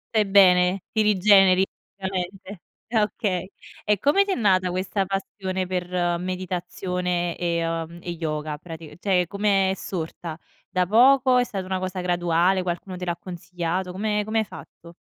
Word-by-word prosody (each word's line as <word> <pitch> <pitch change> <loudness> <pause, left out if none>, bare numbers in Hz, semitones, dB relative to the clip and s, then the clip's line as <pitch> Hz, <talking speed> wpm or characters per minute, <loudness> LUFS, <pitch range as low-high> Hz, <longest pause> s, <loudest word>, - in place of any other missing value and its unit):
Stai 215 -1 +4
bene. 185 -1 +5
Ti 220 - +2
rigeneri 195 -2 +5 0.3
la 190 -1 -4
mente. 190 0 -5 0.3
Ah, 225 -1 +2
okay. 200 -4 -2 0.3
E 210 -2 +1
come 295 +8 +4
ti 400 - -3
è - - +1
nata, 185 -4 +2
questa 185 +2 -1
passione 190 -1 -3
per 180 -1 -3 0.3
meditazione 180 -1 -3
e, 170 -1 -1
uhm, 165 +1 -4
e 175 - -5
yoga, 155 -2 -3
prati 160 -1 -10
cioè 180 -2 +1
com' 200 +4 -7
è 195 -2 +3
sorta? 165 -3 -6 0.3
Da 180 -1 +1
poco? 255 +4 +5
È - - +3
stata 195 -6 -5
una 190 0 -2
cosa 185 0 -4
graduale? 175 +1 +2
Qualcuno 180 +1 -4
te 180 - -7
l'ha 175 -1 -2
consigliato? 180 0 -4
Come 210 +3 -1
come 220 +2 0
hai 220 - 0
fatto? 170 -3 -13
185 Hz, 165 wpm, -24 LUFS, 175-200 Hz, 0.3 s, bene